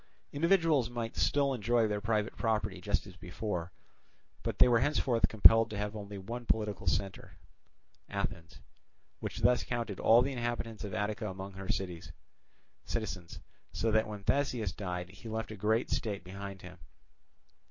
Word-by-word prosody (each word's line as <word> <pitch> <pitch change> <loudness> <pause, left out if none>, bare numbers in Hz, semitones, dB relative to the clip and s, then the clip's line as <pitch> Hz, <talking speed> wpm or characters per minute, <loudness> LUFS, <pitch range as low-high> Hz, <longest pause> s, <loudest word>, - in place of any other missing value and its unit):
Individuals 165 -5 +3
might 120 -2 -4
still 140 -1 +2
enjoy 120 -1 +2
their 105 -1 -2
private 105 0 0
property 105 -5 -1
just 100 +3 0
as 95 -3 -12
before, 90 0 -4 0.7
but - - -3
they - - +7
were 120 -2 +4
henceforth 130 -3 +2
compelled 115 +1 +7
to 105 - -5
have 105 +1 -3
only 100 -1 -6
one 115 +6 -6
political 105 -5 -1
centre, 95 +4 -2 0.7
viz., - - -9
Athens; 80 -1 -4 0.6
which - - -5
thus 125 - +4
counted 115 -5 -3
all 115 +2 +6
the 140 - -2
inhabitants 120 -3 -3
of 100 -3 -5
Attica 105 +2 -2
among 95 +1 -6
her 95 0 -8
citizens, 90 +1 -6 0.3
so 115 - 0
that 110 0 +3
when 105 -2 -7
Theseus 120 -5 +1
died 90 -3 -4
he 110 +4 -10
left 110 0 -3
a - - -5
great 110 +3 +1
state 100 -5 -1
behind 100 +1 -8
him. 90 0 -11
105 Hz, 155 wpm, -32 LUFS, 95-115 Hz, 0.7 s, they